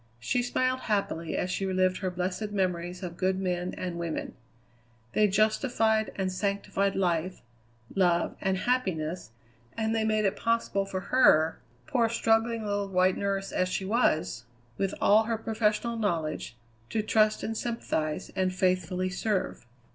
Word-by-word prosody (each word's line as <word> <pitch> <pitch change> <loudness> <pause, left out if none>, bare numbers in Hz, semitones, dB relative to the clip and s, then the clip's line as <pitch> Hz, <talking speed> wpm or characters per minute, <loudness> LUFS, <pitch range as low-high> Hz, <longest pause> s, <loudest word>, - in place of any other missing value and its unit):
She 185 - 0
smiled 255 +1 0
happily 200 -6 -1
as 180 - -1
she 195 - -2
relived 185 -1 +1
her 190 - -1
blessed 185 +4 -3
memories 180 -2 -2
of 175 -1 -6
good 190 0 +1
men 180 -1 -2
and 175 -2 -4
women. 170 -2 -3 0.8
They 210 - +4
justified 220 +1 +2
and 190 -1 -1
sanctified 200 0 -1
life, 180 -2 0 0.5
love, 175 -3 +2
and 190 0 +1
happiness, 185 - -1 0.5
and 220 0 0
they 225 -1 +1
made 215 -1 +1
it 195 +1 +1
possible 230 -3 0
for 190 -1 -3
her, 160 -11 +5 0.3
poor, 230 - +1
struggling, 225 0 +1
little 205 -1 -1
white 185 0 +3
nurse 195 -1 -2
as 185 - 0
she 190 - -2
was, 160 - +1 0.3
with 195 +5 -1
all 215 +2 +5
her 230 0 -1
professional 220 +1 0
knowledge, 160 - -2 0.3
to 220 - -1
trust 215 0 +2
and 225 - -2
sympathize, 190 -10 -2
and 185 -1 0
faithfully 185 0 +1
serve. 195 - -2
195 Hz, 145 wpm, -28 LUFS, 180-220 Hz, 0.8 s, her